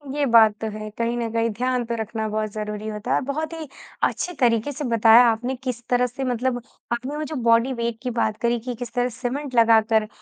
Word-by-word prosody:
ये 295 -1 +1
बात 225 -4 +6
तो 220 - -2
है, 215 0 -6
कहीं 235 +1 -1
न 235 -1 -2
कहीं 230 0 +1
ध्यान 250 +3 -1
तो 235 0 -3
रखना 220 0 -3
बहुत 215 0 -2
ज़रूरी 210 0 -5
होता 210 0 -3
है, - - +1
बहुत 310 +4 -3
ही 320 -2 -6 0.4
अच्छे 355 - 0
तरीके 235 +2 +2
से 295 +2 -6
बताया 230 0 +6
आपने 240 +4 -1
किस 250 -2 -3
तरह 250 0 +3
से 250 +3 -6
मतलब 250 0 -1 0.3
आपने 255 +5 -4
वो 305 - -2
जो 310 +1 -5
बॉडी 230 +3 +3
वेट 235 -2 -3
की 250 - -2
बात 215 0 0
करी 235 0 +1
कि 245 +2 -5
किस 240 0 -7
तरह 245 0 +1
सीमेंट 255 +3 -4
लगाकर 225 -1 +4
235 Hz, 225 wpm, -23 LUFS, 225-255 Hz, 0.4 s, बात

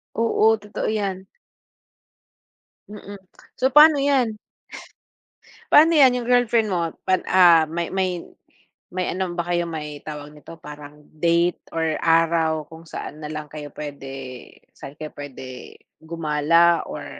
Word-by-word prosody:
Oo, 225 -1 +3
totoo 210 - -5
'yan. 195 -3 -3 1.6
Mm. 205 -1 -10 0.4
So, 260 - -1
pa'no 300 0 +8
'yan? 265 -6 +1 1.3
Pa'no 320 +3 +7
'yan 260 -3 +6
yung 240 - -6
girlfriend 235 -3 +2
mo 170 -3 -2 0.2
pan 185 - +1
ah, 170 -3 +6
may 170 +2 -4
may 185 -2 -2 0.7
may 180 0 -3
ano 185 -1 -3
ba 170 - -2
kayo, 175 0 0
may 150 -3 -6
tawag 150 -1 -9
nito, 150 +2 -13
parang 150 -1 -12
date 170 +2 +1 0.2
or 160 -1 -1
araw 165 -1 +2
kung 165 +1 -13
saan 150 - -8
na 150 - -6
lang 155 -1 -7
kayo 150 -1 -8
puwede 145 -2 -8 0.6
saan 140 +2 -12
kayo 155 0 -8
pwede 130 -3 -10 0.2
gumala 165 +1 +2
or - - -7
170 Hz, 135 wpm, -22 LUFS, 150-195 Hz, 1.6 s, pa'no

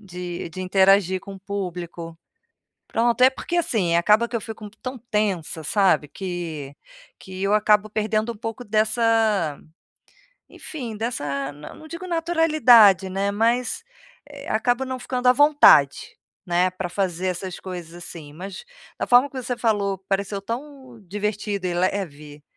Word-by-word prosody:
de 180 -3 -6
de 185 +2 -7
interagir 190 0 +3
com 195 +1 -10
o 195 - -12
público. 175 -4 -6 0.7
Pronto 235 +1 +1
é 260 - +8
porque 335 +6 -4
assim 210 - +1
acaba 210 +7 +4
que 235 - -12
eu 230 - 0
fico 220 -1 -8
tão 255 0 -5
tensa 205 -8 -2
sabe 185 -3 +2
que 165 -7 -6 0.5
que 190 0 -9
eu 200 +1 +2
acabo 210 0 +3
perdendo 215 +2 -1
um 230 - -14
pouco 225 +3 -6
dessa, 215 -6 +1 0.9
enfim 255 -10 -7
dessa, 145 - -3
não 150 - -12
digo 335 +3 -7
naturalidade 310 - +5
né 195 +2 -1
mas, 230 +4 0 0.5
eh, 285 0 -11
acabo 245 +4 +1
não 260 0 -4
ficando 250 0 -3
à 250 - +8
vontade, 270 - +5 0.3
né 175 +1 +2
para 185 -1 -5
fazer 185 -1 -1
essas 185 0 -4
coisas 175 -3 -8
assim 165 -4 -9
mas, 190 +3 -8 0.4
da - - -2
forma 250 +3 +5
que 260 -1 -6
você 245 0 -3
falou 205 -4 0
pareceu 200 +1 -2
tão 260 +1 -7
divertida 205 0 -3
e 180 - -1
leve, 150 -6 -3
200 Hz, 145 wpm, -23 LUFS, 180-235 Hz, 0.9 s, é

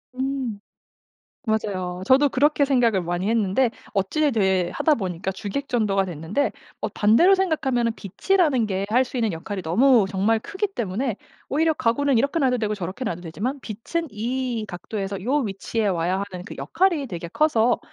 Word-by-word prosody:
음. 260 -5 -2 0.9
맞아요. 185 -4 -2
저도 275 +2 +5
그렇게 285 +2 +3
생각을 235 -8 +2
많이 175 +4 -2
했는데 225 +2 +2 0.2
어찌에 280 +10 +1
되 190 -4 +2
하다 310 - +3
보니까 185 -2 -3
주객전도가 205 -1 -1
됐는데 175 - -1 0.3
어 - - -1
반대로 235 - +4
생각하면은 265 -11 +1
빛이라는 265 - +1
게 195 -1 -2
할 250 +3 +4
수 255 - -8
있는 225 -5 +1
역할이 190 +4 -5
너무 225 +5 +4
정말 205 +3 +1
크기 400 - -2
때문에 235 - -2 0.3
오히려 320 +3 +2
가구는 265 0 +1
이렇게 280 +6 +1
놔도 250 -2 +2
되고 215 -1 -1
저렇게 190 +6 -5
놔도 175 -4 -3
되지만 215 - -4
빛은 285 +11 -4
이 235 +1 -2
각도에서 195 +1 -5
요 265 +6 +1
위치에 220 -2 -1
와야 180 0 0
하는 180 -1 -7
그 - - -9
역할이 335 -6 +1
되게 170 -4 -6
커서 245 - +2
225 Hz, 360 characters per minute, -23 LUFS, 190-270 Hz, 0.9 s, 저도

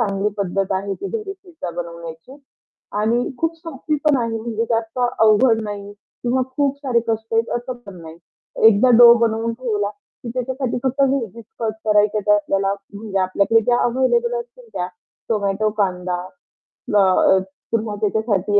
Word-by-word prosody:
चांगली 200 -2 0
पद्धत 195 0 -1
आहे, 195 +1 -2
की 395 - -6
घरी 425 -3 -4
पिझ्झा 350 - -8
बनवण्याची. 170 - -8 0.6
आणि 235 +3 +1
खूप 330 0 -1
सोपी 315 -2 -4
पण 300 -2 +4
आहे, 230 -2 -1
म्हणजे 230 0 -2
जास्त 225 +1 -1 0.2
अवघड 225 +1 +4
नाही 205 -1 -6
किंवा 245 +5 -3
खूप 280 -1 +1
सारे 250 -4 +2
कष्ट 225 0 -2
आहेत, 230 +1 +2
असं 245 +2 -4
पण 190 -3 -10
नाही. 160 +1 -11 0.5
एकदा 225 +3 +6
डो 240 -1 +10
बनवून 225 +1 -1
ठेवला, 220 -4 -1
की 210 +3 -14
त्याच्यासाठी 255 0 -2
फक्त 265 +1 -1
व्हेजीस 235 -5 -1 0.2
कट 220 -1 0
करायच्या 210 0 +3
त्या 210 - +6
आपल्याला, 195 -1 0 0.2
म्हणजे 200 -1 -3
आपल्याकडे 200 +4 +3
ज्या 240 +2 +2
अव्हेलेबल 265 - +1
असतील 480 0 -14
त्या. 180 - -2 0.4
टोमॅटो, 210 -1 0
कांदा. 180 -2 0 0.8
ना 210 - +4 0.3
अ, - - +5 0.3
पुन्हा 220 -2 -1
त्याच्यासाठी 205 -1 +1
225 Hz, 155 wpm, -20 LUFS, 200-255 Hz, 0.8 s, डो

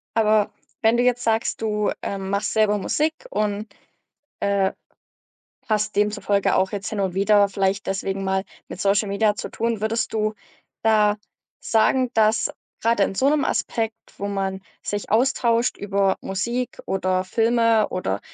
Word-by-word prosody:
Aber 215 -2 +3 0.3
wenn 225 +2 +4
du 245 - +3
jetzt 250 0 +2
sagst, 225 0 0
du, 210 -1 0
äh, 200 - -3
machst 195 +2 -2
selber 215 -1 +3
Musik 305 +10 0 0.2
und, 210 - -1 0.7
äh, 200 -1 +1 1.0
hast 215 -1 0
demzufolge 205 -1 +1
auch 190 0 +1
jetzt 200 -2 -3
hin 215 - -3
und 190 -2 -1
wieder 200 +1 +4
vielleicht 195 0 -1
deswegen 195 0 -2
mal 190 0 0 0.2
mit - - -8
Social 200 +1 +2
Media 205 +1 +2
zu - - -6
tun, 230 -2 -2
würdest 220 +1 -1
du 215 0 0 0.5
da 210 -2 +4 0.4
sagen, 250 +2 +2
dass 220 0 +3 0.3
grade 230 -2 +2
in 195 - +1
so 265 - +3
'nem 295 -1 +2
Aspekt, 225 -1 -1 0.2
wo 200 - -3
man 195 -1 -2 0.2
sich 205 -1 -4
austauscht 235 0 +2
über 200 -1 +1
Musik 235 +6 -3
oder 185 -1 0
Filme 230 +1 +2
oder 100 - -2
210 Hz, 150 wpm, -23 LUFS, 195-225 Hz, 1.0 s, wenn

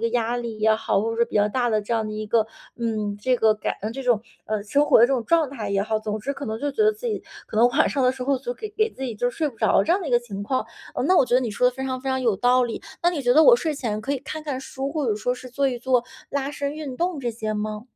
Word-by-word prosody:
个 230 - +1
压 235 0 0
力 235 -2 -5
也 215 0 +4
好， 205 -2 0
或 220 - -1
者 - - -5
说 235 - +4
比 230 - -3
较 205 0 +4
大 245 +1 0
的 215 -1 +2
这 210 +3 -2
样 220 -1 0
的 215 - -5
一 215 0 -4
个， 220 0 +2 0.3
嗯， 215 -3 -2
这 255 +3 +2
个 220 -2 +4
感 210 - -3 0.2
这 270 +3 -6
种， 240 -4 +2 0.2
呃， 215 -1 -2
生 285 +8 +2
活 - - +6
的 235 - +7
这 270 - -1
种 245 -3 +1
状 325 -5 +3
态 225 -7 -5
也 200 0 +1
好， 215 +1 0
总 215 0 -3
之 275 +7 -2
可 280 -1 -7
能 220 0 -3
就 290 +4 -1
觉 430 - 0
得 430 - +5
自 435 +3 -7
己 440 -3 -2 0.2
可 - - -11
能 235 +2 +6
晚 280 +5 +3
上 275 - 0
的 255 - +5
时 260 -1 -6
候 275 -1 +1
就 - - -4
给 435 -3 -7
给 435 +1 +1
自 265 - -10
己 250 -4 -3
就 245 +4 0
睡 310 +5 -1
不 240 - -12
着 - - +4
这 330 - +3
样 380 - +2
的 340 - -4
一 - - -3
个 240 - +5
情 200 -5 -7
况。 255 +5 -1 0.3
呃， - - -1
那 370 - +4
我 280 - +6
觉 245 - +1
得 255 - +5
你 235 - -2
说 250 +4 +3
得 - - -1
非 265 - -4
常 260 -1 -3
非 270 - -4
常 260 0 0
有 230 -5 +3
道 250 +2 +4
理， 235 -2 -4 0.2
那 345 - +4
你 320 - -3
觉 245 - +4
得 315 - +7
我 485 - +8
睡 320 -10 -2
前 220 -6 -3
可 270 +6 -2
以 - - -2
看 310 +3 -6
看 285 -4 -3
书， 270 +1 -5
或 300 -2 -2
者 215 - +2
说 245 +4 -1
是 255 0 -10
做 275 +2 +1
一 250 -2 -3
做 250 0 +2 0.3
拉 280 0 -1
伸 285 0 -3
运 290 -5 -6
动 345 -3 -1
这 245 -2 -1
些 220 -1 -3
吗？ 210 0 -3
245 Hz, 355 characters per minute, -24 LUFS, 220-280 Hz, 0.3 s, 我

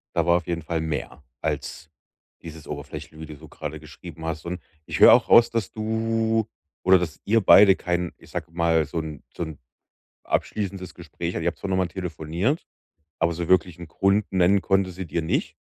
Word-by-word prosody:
Da 85 -2 +2
war 85 0 +5
auf 90 -2 -3
jeden 85 -2 -3
Fall 80 0 -2
mehr 75 -3 -4 0.2
als 80 0 -4 0.5
dieses 80 -2 -10
oberflächliche, 75 +2 -8
wie 80 - -7
du 75 0 -10
so 80 +2 -14
grade 75 +1 -7
geschrieben 80 +2 -11
hast. 80 -1 -4
Und 90 +1 -4 0.3
ich - - -4
höre - - +10
auch - - +5
raus, 115 0 +7
dass 115 -4 -2
du 110 0 0 0.4
oder 95 0 +6
dass 85 -3 -5
ihr 115 +2 +3
beide 95 -1 +7
kein, 90 -1 -2
ich - - -18
sage 85 -1 -5
mal 85 -1 +2
so 75 +3 -5
'n 80 -2 -7
so - - -3
'n 80 -3 -8 0.7
abschließendes 95 -3 -3
Gespräch 85 0 -6
ihr 85 - -3
habt 85 - -1
zwar 100 - -5
noch 95 - +1
mal 95 -2 +1
telefoniert, 90 - -2 0.5
aber 85 +1 +2
so 85 0 -4
wirklich 90 -2 +2
'n 85 -2 -9
Grund 100 +4 +1
nennen 95 +1 +3
konnte 95 -1 +1
sie 90 0 -7
dir 85 +2 -2
nicht. 80 - -1
85 Hz, 200 wpm, -24 LUFS, 80-95 Hz, 0.7 s, höre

